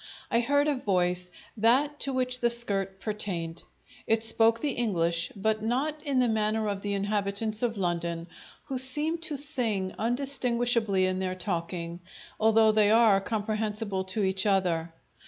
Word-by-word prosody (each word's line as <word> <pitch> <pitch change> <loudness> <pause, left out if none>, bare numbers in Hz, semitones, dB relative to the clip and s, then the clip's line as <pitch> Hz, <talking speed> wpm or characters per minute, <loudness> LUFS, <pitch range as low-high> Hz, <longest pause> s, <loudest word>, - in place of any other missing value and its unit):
I 235 - +3
heard 285 +4 +1
a 300 - +2
voice, 180 -7 -1 0.3
that 265 +7 +2
to 275 - 0
which 255 -1 0
the 240 -1 +2
skirt 195 -5 +1
pertained. 180 -6 -3 0.5
It 225 0 +2
spoke 225 0 +3
the 290 +3 -1
English, 170 -8 -1
but 215 +2 -1
not 275 +7 -1
in 280 -3 -2
the 250 -1 +3
manner 220 -1 0
of 200 -1 -3
the 205 0 -2
inhabitants 205 +1 -2
of 235 -3 -1
London, 170 -2 -2 0.4
who 265 -3 -2
seem 295 +6 +2
to 315 -3 -2
sing 240 -10 +1
undistinguishably 240 -5 +1
in 185 0 -1
their 185 -1 -2
talking, 170 -2 -4 0.4
although 220 0 +4
they 215 -1 +3
are 220 -3 +5
comprehensible 210 -1 -2
to 190 +3 -2
each 190 +1 0
other. 175 -4 0
215 Hz, 155 wpm, -27 LUFS, 190-240 Hz, 0.5 s, are